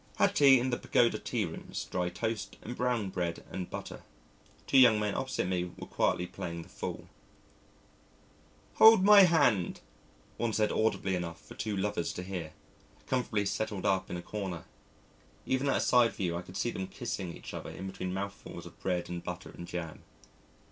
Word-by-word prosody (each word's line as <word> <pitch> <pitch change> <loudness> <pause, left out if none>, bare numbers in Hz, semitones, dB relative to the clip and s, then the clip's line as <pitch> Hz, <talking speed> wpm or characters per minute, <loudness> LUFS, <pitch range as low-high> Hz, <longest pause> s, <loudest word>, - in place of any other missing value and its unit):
Had - - +3
tea 135 -3 +7
in 130 +2 -1
the 120 - -1
Pagoda 120 -1 +2
tea - - -1
rooms, - - -6
dry 90 -1 0
toast 100 +3 -4
and 120 - -6
brown 120 -6 0
bread 85 -2 -3
and 90 -2 -5
butter. - - -7 0.6
Two 135 - +5
young 115 -4 +7
men 105 -1 0
opposite 130 0 -2
me 90 -1 -1
were - - -7
quietly 90 - 0
playing 85 -1 -6
the 90 - -17
fool. 100 +1 -6 1.7
"Hold 220 -3 +9
my 205 -1 +9
hand," 135 - +2 0.6
one 115 -2 -1
said 105 -1 +2
audibly 110 -3 +1
enough 85 -2 -3
for - - -11
two 105 -2 -3
lovers 95 -3 -1
to 90 - -5
hear, 90 -4 -5 0.5
comfortably 120 -5 0
settled 100 -1 -2
up 95 -1 +1
in 90 - -3
a 85 - -7
corner. 95 -5 -5 0.8
Even 130 +2 +1
at - - +3
a - - 0
side 120 -2 +4
view 90 -4 -2
I 85 - -3
could 90 +1 -9
see 120 +5 0
them 95 -3 -4
kissing 95 -8 -5
each - - -10
other - - -6
in 95 - -7
between 95 -1 -4
mouthfuls 100 +1 -6
of - - -13
bread 90 -2 -1
and 85 -1 -5
butter - - -6
and 85 - -9
jam. 85 -3 -5
100 Hz, 180 wpm, -31 LUFS, 90-120 Hz, 1.7 s, Hold